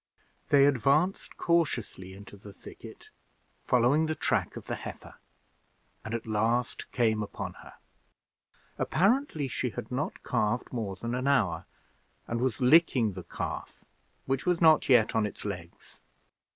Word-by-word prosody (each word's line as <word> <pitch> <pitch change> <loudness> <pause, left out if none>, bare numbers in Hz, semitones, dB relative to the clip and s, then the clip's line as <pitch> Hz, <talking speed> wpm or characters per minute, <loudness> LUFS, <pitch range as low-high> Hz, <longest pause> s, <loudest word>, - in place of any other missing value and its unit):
They 140 -1 +6
advanced 145 - +1
cautiously 125 - -1
into 100 +1 -12
the 100 +1 -12
thicket, - - -13 0.5
following 125 +6 +3
the 155 - -1
track - - -1
of - - -9
the - - -4
heifer, - - -9 0.8
and 110 +1 -4
at 115 - -5
last 115 +3 -1
came 110 -3 +1
upon 105 - -5
her. - - -13 1.1
Apparently 200 - +1
she 125 - -2
had - - -8
not - - -3
calved 110 +5 -1
more 105 -5 -3
than 115 +6 -5
an 130 +2 -2
hour, 120 -11 +1 0.6
and 115 0 -3
was 130 -3 -1
licking 125 - +4
the 90 -1 -8
calf, - - -6 0.4
which 135 0 -1
was 180 -2 +1
not 160 -3 +5
yet 120 -4 +5
on 110 -2 +2
its 105 - -10
legs. 90 -4 -8
120 Hz, 140 wpm, -29 LUFS, 105-145 Hz, 1.1 s, They